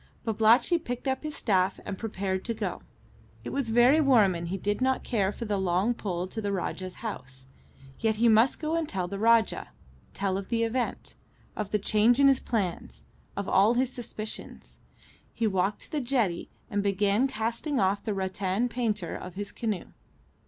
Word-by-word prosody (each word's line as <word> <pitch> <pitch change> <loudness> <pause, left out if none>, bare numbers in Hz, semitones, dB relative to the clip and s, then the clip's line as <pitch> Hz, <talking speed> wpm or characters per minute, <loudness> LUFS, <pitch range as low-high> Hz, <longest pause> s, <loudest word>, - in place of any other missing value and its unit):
Babalatchi 225 - +4
picked 245 -4 -5
up 265 0 0
his 305 -1 -5
staff 190 -3 +1
and 200 - -4
prepared 190 -3 -3
to 230 - -1
go. - - -3 0.6
It - - -5
was 275 -4 -1
very 245 +7 +5
warm, 235 -10 +5
and 170 0 -4
he 190 +3 -2
did 205 +5 -2
not 260 0 +1
care 200 -5 0
for 230 - -6
the 205 -2 -1
long 190 +5 +1
pull 180 -6 -3
to 220 - -5
the 205 -1 -2
Rajah's 185 +1 -4
house. 130 - -7 0.5
Yet 220 -1 +1
he 235 +2 +3
must 225 +3 +4
go 315 +1 -1
and 330 -2 -1
tell 185 -2 -2
the 200 +2 -5
Rajah 230 0 +3 0.5
tell 195 -1 -1
of 195 - -9
the 230 -1 +1
event; 235 +2 -2 0.4
of 210 -2 -3
the 210 - +1
change 215 +4 +3
in 280 - +7
his 270 -1 +3
plans; 180 - -3 0.3
of 200 -1 -3
all 205 +5 +4
his 255 +1 +1
suspicions. 220 -3 -7 0.6
He 230 - 0
walked 195 0 0
to - - -13
the 300 - -1
jetty 235 -9 0 0.2
and 205 -4 -1
began 200 +4 +2
casting 235 +4 -2
off 195 +1 +1
the 215 -3 -2
rattan 190 +4 -1
painter 215 -6 -2
of 180 -1 -8
his 205 +1 -5
canoe. 215 -6 -3
215 Hz, 185 wpm, -28 LUFS, 195-240 Hz, 0.6 s, in